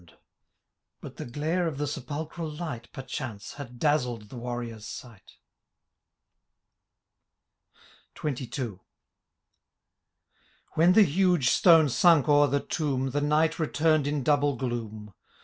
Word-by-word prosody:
56 85 - -24 0.8
But - - -10
the - - -6
glare 160 +6 -1
of 155 -4 -4
the 145 - -1
sepulchial 150 +3 -5
light, 125 -9 -6
Peichance, 125 -5 -6
had 125 -4 -9
dazzled 125 -7 0
the - - -10
warrior^s 120 -2 -5
sight 110 -1 -10 2.9
XXII. 130 -7 -4 2.0
Wlien 175 +4 +4
the 220 - +8
huge 175 -5 +2
stone 165 -4 +6
sunk 160 +2 +4
o^ei 145 -1 +4
the 140 +1 0
tomb. 135 -4 -2
The 145 +2 -1
night 155 +3 +1
returned 155 -1 +1
in 145 -2 -1
double 145 0 +2
gloom 110 -5 -5
145 Hz, 115 wpm, -27 LUFS, 120-155 Hz, 2.9 s, the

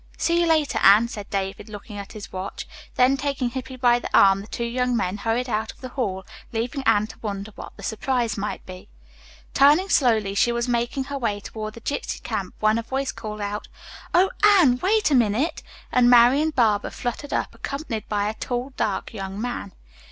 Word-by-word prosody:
"See 340 0 +2
you 340 - +2
later, 310 -3 +2
Anne," 210 +4 +7
said 205 -3 -7
David, 195 +2 -3
looking 210 0 -9
at 200 - -9
his 210 -2 -9
watch. 185 +1 -5 0.3
Then 255 +2 +4
taking 270 -3 -2
Hippy 260 +1 -6
by 245 -1 +3
the - - -6
arm 195 0 +6
the 205 - -11
two 235 - -4
young 250 +1 0
men 190 -1 -1
hurried 230 +4 -1
out 220 -1 -2
of - - -23
the 255 - -6
hall, 195 -8 -3 0.3
leaving 240 +5 -2
Anne 215 -2 +4
to - - -12
wonder 205 -1 -5
what - - -10
the - - -11
surprise 235 -1 -1
might 205 +1 -4
be. 185 0 -11 0.6
Turning 300 +8 +5
slowly 220 - +3
she 230 +4 +3
was 235 +1 -1
making 240 +2 0
her 280 +1 -5
way 210 -5 -1
toward 215 +1 -7
the 230 - -11
gypsy 285 - -3
camp 200 -5 -4
when 215 +1 +3
a - - -1
voice 265 +3 -2
called, 215 -1 -7 0.7
"O 370 +2 +4
Anne, 355 -12 +6
wait 420 -2 +2
a - - +4
minute," 245 +5 +2 0.3
and 245 -1 +4
Marian 250 +6 +6
Barber 225 -8 +2
fluttered 245 +4 -5
up - - -1
accompanied 275 -6 -5
by 205 -1 0
a 215 - -2
tall, 245 +3 -4
dark - - -2
young 195 -1 -6
man. 240 -4 -4
235 Hz, 195 wpm, -24 LUFS, 210-265 Hz, 0.7 s, Anne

